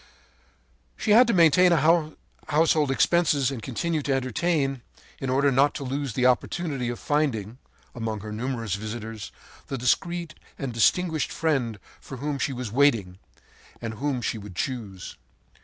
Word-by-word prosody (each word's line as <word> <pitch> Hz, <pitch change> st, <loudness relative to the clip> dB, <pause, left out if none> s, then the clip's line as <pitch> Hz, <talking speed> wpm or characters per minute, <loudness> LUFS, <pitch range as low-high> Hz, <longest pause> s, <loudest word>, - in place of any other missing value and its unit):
“She -, -, -1 dB
had 235 Hz, +4 st, +7 dB
to 235 Hz, -, +2 dB
maintain 175 Hz, +1 st, +5 dB
her 160 Hz, 0 st, +3 dB, 0.3 s
household 155 Hz, -1 st, +3 dB
expenses 145 Hz, -1 st, +2 dB
and 130 Hz, -4 st, -5 dB
continue 155 Hz, +7 st, -2 dB
to 140 Hz, -1 st, -1 dB
entertain, 135 Hz, +1 st, 0 dB, 0.4 s
in 135 Hz, -, -3 dB
order 140 Hz, +2 st, +3 dB
not 140 Hz, +2 st, +3 dB
to -, -, -4 dB
lose 135 Hz, -1 st, -3 dB
the 125 Hz, +3 st, +1 dB
opportunity 130 Hz, +1 st, 0 dB
of 120 Hz, -, -4 dB
finding, 125 Hz, -7 st, -1 dB, 0.3 s
among 110 Hz, -3 st, -4 dB
her 105 Hz, +1 st, -7 dB
numerous 115 Hz, -2 st, -3 dB
visitors, 110 Hz, +1 st, -6 dB, 0.4 s
the 135 Hz, -, -3 dB
discreet 170 Hz, +7 st, 0 dB, 0.2 s
and 135 Hz, -3 st, -4 dB
distinguished 160 Hz, +7 st, +2 dB
friend 135 Hz, -9 st, 0 dB, 0.2 s
for 135 Hz, -, -9 dB
whom 145 Hz, +1 st, -3 dB
she 140 Hz, -, 0 dB
was 125 Hz, -4 st, -5 dB
waiting, 115 Hz, -9 st, +2 dB, 0.6 s
and 115 Hz, -1 st, -5 dB
whom 130 Hz, +1 st, -2 dB
she 110 Hz, -, -2 dB
would 100 Hz, -3 st, -10 dB
choose. 105 Hz, -6 st, -5 dB
135 Hz, 150 wpm, -25 LUFS, 115-155 Hz, 0.6 s, had